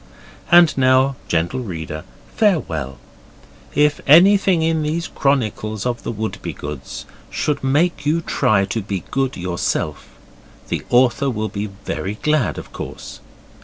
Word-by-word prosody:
And 175 -2 +7
now, 130 +1 +4
gentle 85 +10 0
reader, 80 -7 -6 0.3
farewell. 80 - 0 0.8
If 150 0 +3
anything 185 +2 +6
in 160 -1 +1
these 155 +2 -2
chronicles 110 -6 -1
of 120 -1 -2
the - - -4
Wouldbegoods 75 - -6 0.2
should 150 -2 -2
make 145 +3 +1
you 155 +3 +1
try 110 -11 +2
to 110 +3 -3
be 95 -3 -4
good 135 0 -1
yourself, 85 -4 -2 0.6
the - - -1
author 125 +2 +3
will 110 -3 -2
be 100 +2 -4 0.2
very 100 +2 -3
glad, 150 -3 +1
of - - -9
course. - - -8
130 Hz, 130 wpm, -20 LUFS, 100-150 Hz, 0.8 s, And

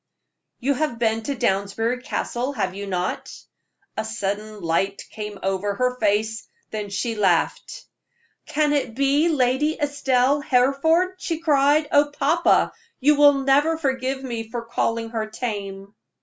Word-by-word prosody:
"You 275 +3 +1
have 295 -3 -2
been 225 -1 +1
to 280 - -2
Downsbury 225 +4 0
Castle, 255 0 -3
have 190 -7 -2
you 200 +1 -6
not?" 180 -1 -2 0.7
A 220 - -2
sudden 215 -1 -4
light 190 +3 -1
came 210 -1 -6
over 195 +1 -1
her 250 +3 0
face, 215 +1 0 0.2
then 210 -2 -4
she 205 +4 -2
laughed. 190 -6 0 0.6
"Can 300 -1 +1
it 260 -6 -1
be 280 +5 +3
Lady 290 +1 +1
Estelle 285 -1 +1
Hereford?" 310 +7 +2
she 330 -3 -2
cried. 300 -1 +3
"Oh, 290 0 +5
papa, 290 +4 +2 0.3
you 295 +3 +5
will 285 -1 +5
never 290 +4 +3
forgive 265 -2 -2
me 230 -3 -5
for 235 0 -4
calling 230 -1 -1
her 220 -2 -2
tame." 200 -3 -5
245 Hz, 140 wpm, -23 LUFS, 210-285 Hz, 0.7 s, Oh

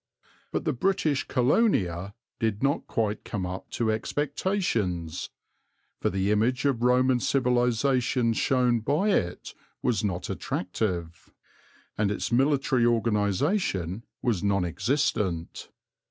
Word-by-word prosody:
But - - -2
the - - +2
English 155 -1 0
Colonia 105 - +1 0.2
did 110 0 -1
not 140 +1 +1
quite 110 -2 -1
come 95 -3 -3
up 90 +1 -6
to 110 -2 0
expectations, 110 - -1 0.7
for - - +1
the 95 +2 0
image 120 +6 +1
of 135 -5 +1
Roman 125 +1 +3
civilization 125 -1 +2
shown 125 0 +2
by 150 - +1
it 90 - -1 0.3
was 110 -4 +1
not 95 -3 -2
attractive, 90 -3 -3 0.7
and 105 -2 +2
its 105 +3 -2
military 135 0 +2
organization 110 - +1 0.2
was 115 -8 0
non 100 -2 +2
existent. 95 - -1
115 Hz, 110 wpm, -27 LUFS, 100-135 Hz, 0.7 s, Roman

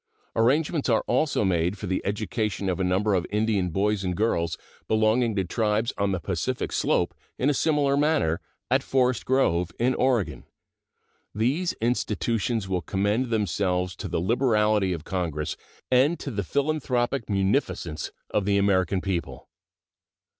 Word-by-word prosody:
Arrangements 145 +6 +2
are 115 - +3
also 130 0 +1
made 90 +1 +1
for 100 - -6
the 95 -1 -1
education 105 -1 -2
of 90 - -1
a - - +1
number 95 +3 +1
of 90 -2 0
Indian 105 -3 +1
boys 100 +3 0
and 90 -2 -2
girls 85 -7 0 0.3
belonging 110 +1 +2
to 95 - +1
tribes 110 +4 0
on 100 -1 0
the 95 - -1
Pacific 80 - -2
Slope - - +1 0.2
in 140 +3 +2
a - - +1
similar 145 -2 +2
manner, 145 - +1 0.3
at - - +4
Forest 125 -2 +1
Grove, 90 -10 +2
in 125 +2 +2
Oregon. 115 - 0 0.9
These 135 - +1
institutions 115 -2 -1
will 95 -2 -1
commend 105 +8 0
themselves 90 -4 0
to 100 - -5
the 85 - -1
liberality 105 -1 +2
of 85 -3 -4
Congress 80 -5 -3 0.4
and 135 +7 +4
to 140 - -5
the 100 -3 -2
philanthropic 135 - -1
munificence 95 - -1 0.2
of 105 - +1
the 100 0 +2
American 95 -2 +2
people. 85 -10 -4
105 Hz, 145 wpm, -26 LUFS, 95-125 Hz, 0.9 s, at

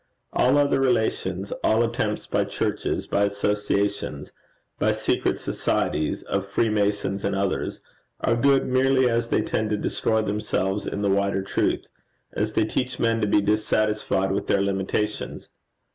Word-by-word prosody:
All 130 +3 +3
other 145 -1 +3
relations, 110 -6 0
all 110 +2 +3
attempts 115 -2 -1
by - - 0
churches, - - -2
by 100 0 +1
associations, 100 -6 -1 0.5
by - - +2
secret - - 0
societies 75 0 -1
of 100 0 -2
Freemasons 100 -1 0
and - - 0
others, 100 -1 -2 0.4
are 115 - +1
good 135 +3 +3
merely 130 0 +3
as 115 0 0
they - - +2
tend 110 -1 -1
to 105 - 0
destroy 110 +1 0
themselves 100 -1 -1
in 100 - -3
the 100 - +2
wider 100 0 +1
truth; - - 0 0.5
as 105 +1 -1
they 110 - +2
teach 125 +4 -2
men 115 -1 +1
to 105 - +1
be 105 - +3
dissatisfied 105 -2 +1
with 100 - -2
their 100 - +2
limitations. 100 +2 -2
105 Hz, 145 wpm, -24 LUFS, 100-115 Hz, 0.5 s, All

